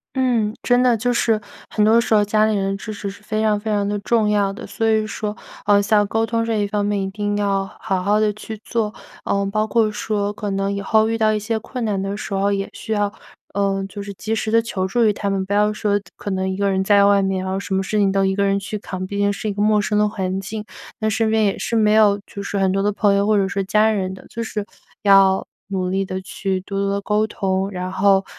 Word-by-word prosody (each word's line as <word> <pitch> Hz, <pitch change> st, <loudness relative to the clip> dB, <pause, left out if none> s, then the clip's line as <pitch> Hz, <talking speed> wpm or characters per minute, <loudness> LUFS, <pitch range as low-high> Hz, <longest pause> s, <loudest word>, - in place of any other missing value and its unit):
嗯， 240 Hz, -5 st, +1 dB
真 245 Hz, 0 st, +3 dB
的， 245 Hz, -2 st, +4 dB
就 245 Hz, +3 st, 0 dB
是 225 Hz, -2 st, +2 dB, 0.3 s
很 210 Hz, -, +1 dB
多 225 Hz, +2 st, +5 dB
时 230 Hz, -, -1 dB
候 210 Hz, -, +5 dB
家 215 Hz, +1 st, +3 dB
里 215 Hz, -1 st, +1 dB
人 195 Hz, -1 st, 0 dB
的 195 Hz, -, -3 dB
支 215 Hz, -, -7 dB
持 200 Hz, -1 st, -5 dB
是 200 Hz, -, -11 dB
非 215 Hz, +1 st, -2 dB
常 215 Hz, -1 st, +2 dB
非 220 Hz, +1 st, -5 dB
常 205 Hz, -1 st, +1 dB
的 205 Hz, 0 st, -1 dB
重 220 Hz, +1 st, +1 dB
要 205 Hz, -2 st, +2 dB
的。 210 Hz, +5 st, -8 dB
所 225 Hz, -, -2 dB
以 220 Hz, -1 st, +2 dB
说， 215 Hz, -1 st, -4 dB, 0.3 s
呃， 205 Hz, -1 st, +5 dB
像 205 Hz, 0 st, +3 dB
沟 225 Hz, +2 st, 0 dB
通 230 Hz, 0 st, 0 dB
这 230 Hz, -1 st, -1 dB
一 205 Hz, -1 st, 0 dB
方 205 Hz, 0 st, -1 dB
面， 205 Hz, 0 st, 0 dB
一 190 Hz, -, -3 dB
定 205 Hz, 0 st, -2 dB
要 200 Hz, -1 st, 0 dB
好 190 Hz, -4 st, -1 dB
好 205 Hz, +3 st, +2 dB
地 215 Hz, -1 st, +2 dB
去 215 Hz, +1 st, -8 dB
做， 220 Hz, -3 st, -1 dB, 0.3 s
呃， 200 Hz, 0 st, 0 dB
包 215 Hz, +1 st, 0 dB
括 220 Hz, -2 st, +2 dB
说 210 Hz, -1 st, -2 dB
可 210 Hz, 0 st, -4 dB
能 195 Hz, +1 st, -1 dB
以 200 Hz, -, -3 dB
后 220 Hz, +2 st, +3 dB
遇 225 Hz, 0 st, 0 dB
到 215 Hz, -1 st, +3 dB
一 215 Hz, -, 0 dB
些 220 Hz, +1 st, -2 dB
困 245 Hz, +2 st, -5 dB
难 200 Hz, -3 st, -1 dB
的 195 Hz, +1 st, -3 dB
时 205 Hz, -, -6 dB
候， 195 Hz, +1 st, +1 dB
也 195 Hz, -1 st, -1 dB
需 220 Hz, -, -4 dB
要， 205 Hz, -1 st, 0 dB, 0.4 s
呃， 195 Hz, -1 st, 0 dB
就 200 Hz, +1 st, -8 dB
是 200 Hz, 0 st, -6 dB
及 215 Hz, +3 st, -4 dB
时 220 Hz, 0 st, -1 dB
地 230 Hz, +1 st, +4 dB
求 190 Hz, -5 st, -2 dB
助 235 Hz, +4 st, +2 dB
于 210 Hz, -, +4 dB
他 200 Hz, 0 st, -3 dB
们。 195 Hz, -1 st, -1 dB
不 200 Hz, -, -3 dB
要 210 Hz, +1 st, +3 dB
说 210 Hz, -1 st, 0 dB, 0.2 s
可 200 Hz, -, -5 dB
能 190 Hz, 0 st, -1 dB
一 190 Hz, -, -3 dB
个 200 Hz, 0 st, +1 dB
人 190 Hz, 0 st, +1 dB
在 200 Hz, 0 st, +5 dB
外 200 Hz, 0 st, +4 dB
面， 190 Hz, -1 st, -1 dB
然 190 Hz, 0 st, -3 dB
后 190 Hz, -, -1 dB
什 195 Hz, -1 st, -3 dB
么 190 Hz, -, +1 dB
事 210 Hz, +3 st, -2 dB
情 200 Hz, -1 st, +3 dB
都 195 Hz, 0 st, +2 dB
一 190 Hz, -, +1 dB
个 200 Hz, +1 st, 0 dB
人 195 Hz, 0 st, +2 dB
去 205 Hz, +2 st, -5 dB
扛， 185 Hz, -2 st, -5 dB
毕 200 Hz, +2 st, -4 dB
竟 205 Hz, 0 st, +2 dB
是 205 Hz, -, -4 dB
一 205 Hz, -, -1 dB
个 205 Hz, -, -3 dB
陌 210 Hz, 0 st, +4 dB
生 210 Hz, 0 st, 0 dB
的 210 Hz, 0 st, +3 dB
环 190 Hz, -2 st, -3 dB
境， 210 Hz, +2 st, -6 dB, 0.3 s
那 220 Hz, -, 0 dB
身 220 Hz, +1 st, +1 dB
边 220 Hz, 0 st, +2 dB
也 200 Hz, -, 0 dB
是 230 Hz, -, -2 dB
没 215 Hz, -1 st, +4 dB
有 210 Hz, -2 st, +5 dB
就 200 Hz, -, -8 dB
是 200 Hz, 0 st, -3 dB
很 190 Hz, -1 st, +2 dB
多 195 Hz, +1 st, +1 dB
的 205 Hz, +1 st, +1 dB
朋 205 Hz, 0 st, +2 dB
友 200 Hz, +1 st, +2 dB
或 215 Hz, -1 st, +3 dB
者 195 Hz, -1 st, +2 dB
是 200 Hz, 0 st, -2 dB
家 210 Hz, +3 st, +3 dB
人 190 Hz, -3 st, -2 dB
的， -, -, -14 dB
就 230 Hz, -, -4 dB
是 210 Hz, -2 st, -4 dB, 0.4 s
要 195 Hz, -1 st, +5 dB, 0.2 s
努 190 Hz, -2 st, -2 dB
力 195 Hz, +1 st, 0 dB
地 185 Hz, 0 st, -4 dB
去 190 Hz, 0 st, -3 dB
多 195 Hz, +1 st, -4 dB
多 200 Hz, -, 0 dB
地 200 Hz, -, -1 dB
沟 210 Hz, +1 st, +1 dB
通， 195 Hz, -2 st, -1 dB
然 185 Hz, -1 st, -4 dB
后 195 Hz, 0 st, +3 dB
205 Hz, 300 characters per minute, -21 LUFS, 195-215 Hz, 0.4 s, 多